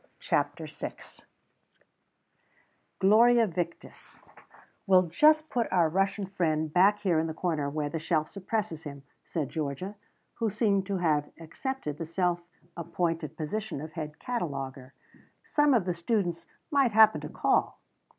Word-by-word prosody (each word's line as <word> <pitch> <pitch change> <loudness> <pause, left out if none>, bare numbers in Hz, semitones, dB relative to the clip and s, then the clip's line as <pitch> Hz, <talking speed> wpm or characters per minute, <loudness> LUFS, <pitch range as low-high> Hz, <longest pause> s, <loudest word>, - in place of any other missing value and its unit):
CHAPTER - - -1
VI - - -6 2.0
"GLORIA 230 +4 +5
VICTIS" 170 -3 -6 0.7
"We'll 185 -1 +6
just 305 - +4
put 240 -6 -1
our 170 -3 +3
Russian 195 +3 0
friend 160 -5 -1
back 195 +3 +5
here 180 -6 +2
in 160 - 0
the 160 - -5
corner, 160 -5 -1
where 150 0 -2
the 160 +3 -3
shelf 155 -1 0
suppresses 195 -4 -3
him," 140 -3 -9 0.2
said 150 -6 -3
Georgia, 155 +6 -4 0.5
who 225 - +1
seemed 200 -2 +1
to 200 -1 -1
have 155 -4 +1
accepted 165 - -5
the 165 - -4
self 175 0 0 0.3
appointed 165 -2 -2
position 200 +2 -4
of 155 +2 -7
head 150 -1 -6
cataloguer. 135 - -5 0.5
"Some 295 -1 +2
of 215 -7 +2
the 180 - 0
students 175 -1 -1 0.2
might 275 -6 +3
happen 220 0 +6
to - - -6
call." - - +1
175 Hz, 140 wpm, -28 LUFS, 155-205 Hz, 2.0 s, We'll